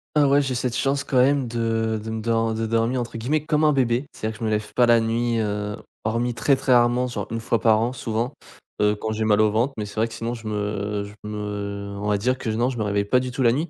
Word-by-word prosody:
Ah 145 -1 +5
ouais, 140 +1 +4
j'ai 135 -2 -2
cette 120 -1 -1
chance 140 +1 0
quand 135 -2 -1
même 135 0 +3
de 115 -1 -1
de 110 - -6
me 115 0 0
de 110 0 -2
dormir 115 +3 +1
entre 115 -1 -6
guillemets 145 +6 0
comme 155 -1 +1
un 155 - +5
bébé, 125 0 +1
c'est-à-dire 110 +1 -4
que 105 - -13
je - - 0
me 110 - +1
lève 105 -1 -2
pas 120 -1 +4
la 115 -1 +6
nuit, 115 +1 0
heu, 105 -1 -2 0.3
hormis 115 +2 0
très, 135 +4 +2
très 130 -1 +1
rarement, 120 +1 +4
genre 120 - -4
1 115 - -3
fois 115 0 0
par 110 -2 +4
an, 120 +2 0
souvent, 115 0 -2 0.5
heu, 105 0 +3
quand 110 +1 -4
j'ai 110 0 -1
mal 105 -1 +4
au 110 -1 +3
ventre. 120 +6 +1
Mais 105 - -2
c'est 105 - -10
vrai 110 +1 +1
que 115 - -11
sinon 115 +1 -3
je 115 -2 -8
me 105 -1 -2
je 100 0 -9 0.2
me, 105 - -4
heu, 100 -1 -5
on 105 - -3
va 105 -1 +2
dire 125 +5 0
que, 115 - -3
non, 120 +3 +1
je 125 - -6
me - - +1
réveille 100 -1 0
pas 125 +5 +3
du 125 0 -3
tout 130 +1 -1
la 115 - +5
nuit, 155 +7 -1
115 Hz, 285 wpm, -23 LUFS, 105-125 Hz, 0.5 s, la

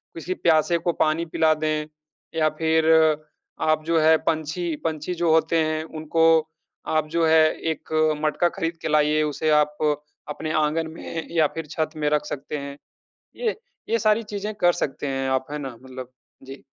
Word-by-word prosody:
किसी 165 +3 -3
प्यासे 165 +1 +3
को 170 0 -1
पानी 155 +2 +1
पिला 160 -1 +2
दें 155 0 -1 0.5
या 155 -1 +3
फिर 160 0 +2 0.8
आप 155 0 +2
जो 165 -1 +2
है 160 0 +6
पंछी 160 +1 -1
पंछी 160 +2 -2
जो 170 -1 +1
होते 160 +1 +3
हैं, 155 0 -1
उनको 160 +1 0 0.6
आप 155 -1 +1
जो 165 - +3
है 160 0 +6 0.3
एक 160 - -7 0.3
मटका 165 +3 +2
ख़रीद 165 -3 -3
के - - -1
लाइए, 150 0 +3
उसे 150 +1 -1
आप 150 0 -2 0.5
अपने 155 +1 -4
आँगन 160 +2 -1
में 160 0 -6
या 155 -2 +4
फिर 165 -1 -4
छत 155 0 -1
में 150 -1 0
रख 150 -1 +1
सकते 145 +2 -5
हैं। 140 0 -7 0.6
ये 455 -4 -1 0.3
ये 230 - +2
सारी 215 +2 +3
चीज़ें 205 +1 -3
कर 175 -3 +3
सकते 145 +1 -5
हैं 135 0 -2
आप, 130 0 0
है 150 - -3
ना? 135 -5 -6
मतलब 130 -1 -9 0.3
जी। 135 +1 -10
155 Hz, 175 wpm, -24 LUFS, 150-165 Hz, 0.8 s, है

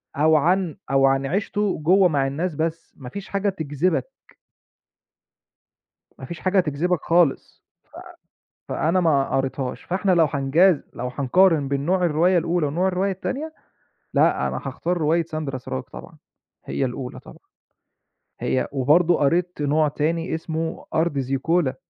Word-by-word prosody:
أو 155 +2 +4
عن 175 +1 +1
أو 135 0 +4
عن 135 0 +2
عيشته 200 +5 -1
جوّه 180 +4 +4
مع 140 -3 +1
الناس 155 +4 -3
بس، 165 +1 -3
مافيش 145 +9 -8
حاجة 200 0 0
تجذبك. 165 - -1 2.1
ما - - -7
فيش 170 -1 -8
حاجة 190 +1 +2
تجذبك 170 +1 0
خالص، 165 -4 +1 1.0
ف - - -9
فأنا 170 +4 +1
ما 140 -5 +2
قريتهاش، 135 -1 -3
فإحنا 190 +2 0
لو 170 -3 +5
هنجاز 150 +5 +3
لو 125 - -5
هنقارن 155 +1 +3
بين 140 0 -1
نوع 180 0 +2
الرواية 175 +3 +3
الأولى، 170 -2 0
ونوع 175 +6 0
الرواية 190 +2 0
التانية، 280 - -4 0.6
لأ، - - +3
أنا - - -3
هاختار 180 +1 -2
رواية 160 +2 +2
ساندرا 155 -5 -5
سراج 65 - -5
طبعًا، - - -12 0.5
هي 135 - -2
الأولى 125 0 -5
طبعًا، - - -14 1.0
هي 130 - 0
وبرضه 155 +6 +3
قريت 170 +3 0
نوع 150 +1 +2
تاني 160 +4 -1
اسمه 160 0 -4
أرض 160 -2 +1
زيكولا. 135 +2 0
160 Hz, 140 wpm, -23 LUFS, 140-180 Hz, 2.1 s, لو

